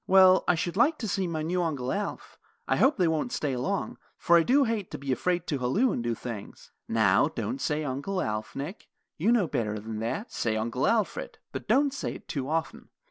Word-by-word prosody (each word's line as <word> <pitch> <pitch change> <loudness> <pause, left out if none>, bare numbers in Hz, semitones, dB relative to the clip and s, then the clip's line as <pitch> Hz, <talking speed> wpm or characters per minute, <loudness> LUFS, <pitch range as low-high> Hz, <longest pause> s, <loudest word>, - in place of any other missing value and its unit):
"Well, 185 0 +7
I 180 - +4
should 175 +1 -2
like 290 +9 +3
to 225 - -4
see 190 -1 0
my 160 -2 -2
new 180 +3 0
Uncle 140 -7 -2
Alf. 205 0 -4 0.3
I - - +2
hope 275 +3 +4
they 180 -3 +3
won't 160 +9 0
stay 145 - -1
long; 135 +11 -2 0.2
for 170 - +4
I 170 - +7
do 270 - +4
hate 225 -6 -2
to - - -6
be 140 -1 -4
afraid 175 +6 0
to 145 - -2
halloo 165 - +2
and 120 - -2
do 120 -1 -1
things." 110 -3 -8 0.2
"Now, 110 +1 +4
don't 250 - -4
say 150 0 0
Uncle 145 +8 -2
Alf, 110 -7 -3
Nick. 150 +9 -6 0.3
You 205 +9 +3
know 235 -6 +4
better 110 -8 -2
than 110 +1 -6
that. 120 - -3
Say 110 -2 -1
Uncle 115 +4 0
Alfred, 220 -3 0
but - - -6
don't 280 0 +3
say - - -4
it - - -12
too 140 -2 -3
often. 160 +1 -3
165 Hz, 220 wpm, -28 LUFS, 125-200 Hz, 0.3 s, Well